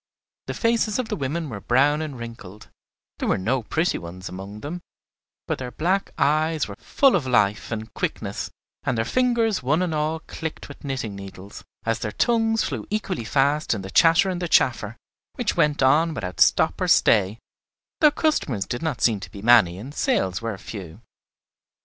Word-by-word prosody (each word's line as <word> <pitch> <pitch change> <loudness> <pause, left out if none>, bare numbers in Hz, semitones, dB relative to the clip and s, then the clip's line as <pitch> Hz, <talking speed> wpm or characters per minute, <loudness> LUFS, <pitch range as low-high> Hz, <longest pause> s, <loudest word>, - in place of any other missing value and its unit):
The - - -4
faces 230 -2 +1
of 255 -3 -2
the - - -1
women 155 +4 -3
were 110 -7 -6
brown 145 +7 +3
and 150 -4 -5
wrinkled; 115 -4 -10 0.5
there - - -2
were - - +2
no 125 +7 0
pretty 160 +10 0
ones 90 +2 -8
among 100 +3 -8
them, 170 +5 -5 0.7
but - - -2
their 125 -1 -4
black 185 +9 0
eyes 155 +1 +2
were 100 - -8
full 275 -5 +3
of 150 -8 0
life 105 -4 +2
and 110 -1 -5
quickness, - - -3 0.3
and 125 - -1
their 115 - 0
fingers 235 - +1
one 150 +8 +1
and 175 -3 -1
all 155 +1 -1
clicked 160 0 -6
with 145 - -12
knitting 130 -7 -3
needles, 100 0 -10 0.2
as 115 0 0
their 105 - -3
tongues 225 -1 +2
flew 120 -7 -4
equally 200 - -2
fast 140 +2 +1
in 100 - -5
the 95 - -7
chatter 165 +4 +5
and 180 -1 -4
the 175 - -1
chaffer, 120 -7 +2 0.4
which - - -1
went 150 -2 +2
on 155 +5 +4
without 90 -7 -5
stop - - +4
or - - +1
stay, 105 -1 +4 0.6
though 305 - +7
customers 155 - 0
did 120 - -4
not 160 -6 -2
seem 110 -4 +3
to - - -9
be 100 - -10
many 110 -7 +5
and 125 +9 -8
sales 135 - 0
were 115 -3 -3
few. 95 -5 -9
130 Hz, 185 wpm, -24 LUFS, 105-165 Hz, 0.7 s, though